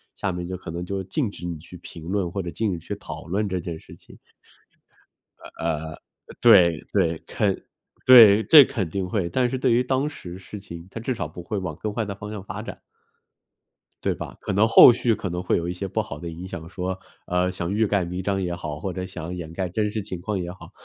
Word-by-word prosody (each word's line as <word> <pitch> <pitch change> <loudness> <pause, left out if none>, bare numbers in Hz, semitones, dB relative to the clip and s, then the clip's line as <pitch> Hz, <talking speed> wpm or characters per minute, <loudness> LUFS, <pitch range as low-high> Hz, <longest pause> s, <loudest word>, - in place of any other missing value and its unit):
下 100 - -2
面 90 0 -5
就 90 0 -4
可 90 -2 -8
能 85 +1 -4
就 95 +1 -3
禁 105 - -1
止 90 - -9
你 85 -3 -4
去 90 +2 -12
评 80 -1 -11
论 90 -1 -1
或 100 - -2
者 90 - -5
禁 105 +4 -1
止 85 - -4
去 - - -5
讨 - - -9
论 100 +4 0
这 95 -2 -2
件 85 -2 -6
事 - - -14
情。 - - -17 1.4
呃 80 -1 -2
呃， - - -15 0.4
对 90 -9 +6
对， 85 -5 +2
肯 100 -3 0 0.4
对， 110 -4 +9
这 150 -5 +9
肯 100 -10 -3
定 95 +2 -2
会， 90 -5 -1
但 125 +6 +1
是 130 - -2
对 130 -1 +2
于 120 +2 +4
当 135 +3 0
时 90 - -9
事 100 +2 -9
情， 85 -2 -10
它 - - -6
至 125 +3 -2
少 - - -3
不 90 - -10
会 105 +3 -3
往 90 -5 -4
更 105 0 -3
坏 115 -1 -1
的 100 -1 -5
方 105 +1 -8
向 100 -3 -6
发 - - -6
展。 - - -8 1.2
对 - - +1
吧， - - -7
可 - - -3
能 105 +3 +4
后 115 - +10
续 120 0 +1
可 95 -3 -4
能 90 +1 -3
会 - - +2
有 85 0 -2
一 90 - -2
些 95 +2 -4
不 110 +4 -1
好 75 -9 -7
的 85 +3 -7
影 85 +2 -7
响， 85 -3 -7
说， 90 +1 -4 0.3
呃， 90 +1 +1
想 85 0 -4
欲 110 +2 +2
盖 100 -2 +1
弥 90 +1 -4
彰 100 -1 0
也 90 -2 -2
好， 75 -4 -6
或 95 - -3
者 90 0 -4
想 90 -2 -6
掩 80 -2 -7
盖 95 +1 -2
真 105 +3 -1
实 110 0 -2
情 95 -3 -6
况 100 +2 -2
也 90 -1 -4
好。 90 - -13
95 Hz, 260 characters per minute, -24 LUFS, 85-105 Hz, 1.4 s, 后